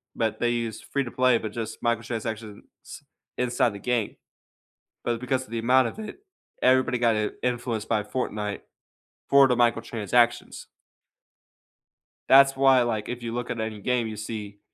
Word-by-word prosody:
but 110 -2 -1
they 120 - +1
use 115 -2 -3
free-to-play 130 -2 +1
but 110 -2 -5
just 115 0 -6
microtransactions 115 -2 -3 0.8
inside 125 -1 +1
the 100 - -8
game. 120 -1 -1 0.9
But 120 -1 -1
because 130 +1 -1
of - - -19
the 115 - -2
amount 125 +2 +4
of 165 - -8
it, 215 - -8 0.4
everybody 130 -1 +3
got, 115 -2 +2
in 105 0 -1
influenced 120 -3 -2
by 110 -2 0
Fortnite 105 -3 -3 0.7
for 140 -1 +7
the 125 - +2
microtransactions. 120 0 +1 1.6
That's 135 0 +7
why, 135 -2 +5
like, 110 -3 -2
if 125 0 -5
you 115 -1 -4
look 120 0 -4
at 115 - -3
any 110 -1 -4
game, 125 0 0
you 110 - -6
see 105 -1 -7
120 Hz, 150 wpm, -25 LUFS, 110-125 Hz, 1.6 s, for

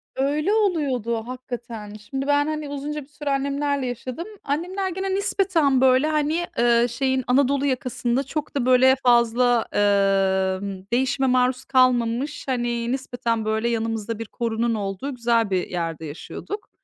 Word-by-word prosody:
Öyle 295 +8 +1
oluyordu 260 - 0
hakikaten. 240 -4 -7
Şimdi 265 +7 -5
ben, 290 +1 +3
hani, 305 -2 -3
uzunca 295 +1 -4
bir - - -20
süre 295 -1 -6
annemlerle 280 0 0
yaşadım. 255 - -5 0.2
Annemler 360 +7 -2
gene 380 +1 -2
nispeten, 370 -9 +2
böyle, 260 +3 +4
hani, 310 +3 0
eee, 235 0 +4
şeyin 260 +2 0
Anadolu 275 +2 +2
yakasında 255 -1 -1
çok 295 +2 -5
da, 255 -3 0
böyle, 260 +1 +6
fazla, 240 0 +3
emm, 195 -1 +1
değişime 265 +1 +1
maruz 255 0 +2
kalmamış, 255 +2 +1
hani, 240 -2 -1
nispeten, 240 -4 -2
böyle, 220 +2 0
yanımızda 225 -1 -2
bir 230 - -4
korunun 230 +1 -1
olduğu 205 +7 -4
güzel 230 -3 +1
bir 185 -2 0
yerde 165 -2 -3
yaşıyorduk. 285 - -7
255 Hz, 140 wpm, -23 LUFS, 230-285 Hz, 0.2 s, böyle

